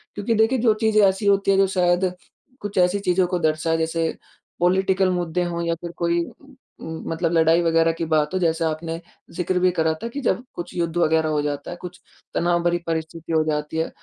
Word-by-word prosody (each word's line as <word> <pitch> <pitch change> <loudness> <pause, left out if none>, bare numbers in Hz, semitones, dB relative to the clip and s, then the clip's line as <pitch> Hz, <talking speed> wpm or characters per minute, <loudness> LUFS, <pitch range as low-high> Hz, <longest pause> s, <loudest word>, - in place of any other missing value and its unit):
क्योंकि 205 +3 -1
देखिए 225 +4 +3
जो 225 -2 +4
चीज़ें 220 -1 +4
ऐसी 190 +2 -1
होती 200 0 +3
हैं 195 - +3
जो 195 0 +4
शायद 180 0 +2 0.5
कुछ 205 -1 -6
ऐसी 180 +2 +3
चीज़ों 185 -1 +2
को 180 0 -1
दर्शाए 160 0 +1
जैसे 165 0 -1 0.4
पॉलिटिकल 190 +1 +2
मुद्दे 175 -1 -1
हों 170 -1 -3
या 170 0 0
फिर 170 - -6
कोई 170 0 +1 0.6
उम, 160 0 -6
मतलब 165 +1 -1
लड़ाई 165 +1 +4
वग़ैरह 165 0 +3
की 165 0 -3
बात 150 +2 +2
हो 185 - +1
जैसे 165 -1 +1
आपने 165 +1 -3 0.4
ज़िक्र 180 +1 0
भी 180 0 +3
करा 160 -2 +1
था 230 - -2
कि, 280 +4 -5
जब 245 0 0
कुछ 175 - -6
युद्ध 170 -1 -2
वग़ैरह 160 -1 +2
हो 150 -1 +1
जाता 145 +1 -4
है, 175 - -7
कुछ 180 0 -8 0.4
तनाव 175 0 +1
भरी 175 0 +2
परिस्थिति 165 0 -4
हो 160 -1 +3
जाती 150 0 -2
है। 160 - 0
175 Hz, 210 wpm, -23 LUFS, 160-185 Hz, 0.6 s, जो